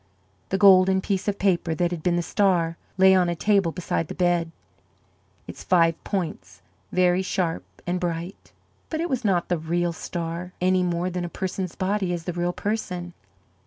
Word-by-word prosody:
The 190 - 0
golden 190 -1 +6
piece 195 0 -2
of 205 -1 0
paper 175 -4 +1
that 175 +2 0
had 170 -3 -4
been 175 +1 +1
the 175 - 0
star 175 -4 +1 0.2
lay 190 0 +7
on 180 -2 +3
a 170 - -1
table 195 -1 +2
beside 165 -2 -2
the - - -7
bed, 175 -2 +1 1.0
its - - -9
five 165 -3 +2
points 185 -6 -4 0.3
very 180 0 +3
sharp 180 -3 -1 0.2
and 180 +1 -1
bright. 175 +1 -5 0.4
But 315 - -3
it 340 +1 -2
was 260 -1 -1
not 185 -5 +1
the 175 -2 0
real 170 +2 -1
star, 170 +2 -5
any 185 +1 +2
more 175 0 -1
than 180 0 -3
a 175 - -4
person's 185 -1 -4
body 190 -1 -1
is 170 -2 -4
the 180 - -4
real 175 +1 -1
person. 180 -4 -3
180 Hz, 180 wpm, -24 LUFS, 170-190 Hz, 1.0 s, lay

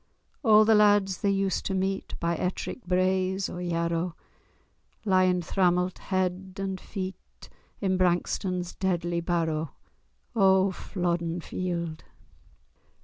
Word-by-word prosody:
A' 215 -3 +7
the 220 - +5
lads 205 -3 +4
they 200 - +2
used 195 -1 0
to 195 - -1
meet 190 +1 -2
By 170 0 0
Ettrick 185 +8 -3
braes 185 +1 +1
or 175 - -5
Yarrow 170 0 -1 0.9
Lyin' 185 -2 +3
thrammelt 180 0 +1
head 185 0 -2
and 190 -1 -3
feet 190 -2 -7 0.3
In 190 -2 +1
Brankstone's 180 0 0
deadly 175 -2 -1
barrow! 165 -3 -1 0.6
O 190 -2 +4
Flodden 175 -2 -2
Field! 170 -2 -4
185 Hz, 110 wpm, -27 LUFS, 175-190 Hz, 0.9 s, A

